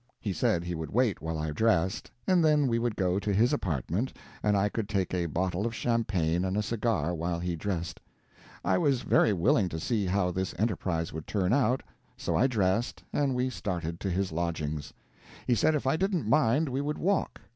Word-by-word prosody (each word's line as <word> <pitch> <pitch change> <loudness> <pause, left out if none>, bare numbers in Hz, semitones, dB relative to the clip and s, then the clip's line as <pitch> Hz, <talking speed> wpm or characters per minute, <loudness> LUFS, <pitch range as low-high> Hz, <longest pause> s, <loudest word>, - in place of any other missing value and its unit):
He 100 -4 -2
said 85 -1 +1
he 90 0 -4
would 80 -1 -4
wait 115 - +1
while 80 0 -3
I 75 0 -2
dressed, 95 0 +1 0.2
and 185 -3 +4
then 150 -2 +4
we 115 -2 +1
would 120 -2 -1
go 95 0 +1
to 105 0 -2
his 115 +7 +3
apartments 95 - -1 0.3
and 105 -1 +2
I 100 +1 +3
could 105 0 -3
take 95 -3 -1
a 90 -2 0
bottle 90 +4 -1
of 115 +1 -2
champagne 95 -9 0
and 95 +1 -1
a 105 - +1
cigar 105 -7 0
while 85 +1 -2
he 90 0 -2
dressed. 85 -1 -3 0.7
I - - +3
was 140 -7 +2
very 110 - +4
willing 100 - +2
to 80 - -4
see 105 +2 0
how 90 -1 +1
this 95 +1 -3
enterprise 90 -6 -1
would 80 0 -6
turn 95 0 +1
out, 130 -1 +2 0.3
so - - -2
I 130 - +4
dressed, 110 -1 0
and 140 -3 +1
we 125 +1 0
started 85 -7 -3
to 100 - -2
his 95 0 -1
lodgings. 80 -3 -3 0.5
He 125 - +2
said 135 +8 +3
if 145 - -2
I 135 +4 +2
didn't 185 - 0
mind 145 +3 +3
we 130 +2 -1
would 150 +1 -2
walk. 195 +3 0
100 Hz, 205 wpm, -29 LUFS, 85-120 Hz, 0.7 s, and